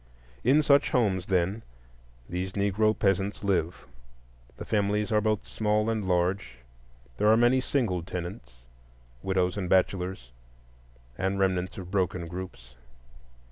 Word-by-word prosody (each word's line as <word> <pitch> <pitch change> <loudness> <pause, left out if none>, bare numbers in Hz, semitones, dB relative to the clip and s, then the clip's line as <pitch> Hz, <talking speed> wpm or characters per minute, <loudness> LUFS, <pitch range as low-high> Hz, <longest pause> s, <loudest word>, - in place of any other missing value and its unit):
In 145 +5 +4
such 140 -1 +4
homes, 95 -7 +1
then, 95 +3 0 0.7
these 90 +2 -4
Negro 100 +2 +1
peasants 95 +1 0
live. 90 -4 -1 0.7
The - - -7
families 105 +1 0
are 105 -1 +3
both 110 -1 0
small 105 +1 0
and 110 -4 -2
large; 90 -5 0 0.6
there 105 - +2
are 110 +1 +6
many 120 +2 +4
single 115 -10 0
tenants,—widows 60 +1 -5
and 90 -3 -3
bachelors, 90 -8 0 0.9
and 95 +1 0
remnants 95 -2 0
of 90 -2 -8
broken 95 -3 -1
groups. 90 -9 -8
95 Hz, 120 wpm, -28 LUFS, 90-105 Hz, 0.9 s, are